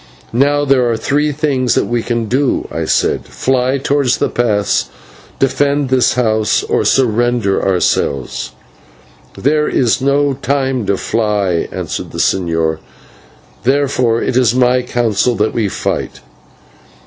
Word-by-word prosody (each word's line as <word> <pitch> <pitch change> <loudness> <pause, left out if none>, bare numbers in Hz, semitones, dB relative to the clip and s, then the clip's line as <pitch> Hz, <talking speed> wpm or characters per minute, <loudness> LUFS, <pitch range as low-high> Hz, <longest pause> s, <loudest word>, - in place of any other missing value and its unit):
"Now, 145 +4 +2
there 130 -3 +2
are 115 - 0
three 145 +6 0
things 140 -4 0
that - - +1
we 120 -1 -1
can 115 0 -2
do," 130 +4 0
I - - -3
said: - - +1
"fly 130 +1 0
towards 140 -1 +1
the - - -1
pass; 105 - 0 0.5
defend 140 +1 +1
this 130 -2 +2
house; 110 -4 +1
or - - 0
surrender 120 -4 +1
ourselves." 80 -8 -1 0.9
"There 150 +2 +1
is 125 -1 +1
no 140 +1 +2
time 135 -4 -1
to 100 - +1
fly," 105 -6 -1
answered - - -5
the - - -6
señor, 80 -3 0 0.8
"therefore 130 -3 +1
it 130 - -1
is 125 -2 +3
my 125 0 +3
counsel 120 -1 0
that 105 0 0
we 110 -4 0
fight." - - -3
125 Hz, 135 wpm, -15 LUFS, 110-135 Hz, 0.9 s, is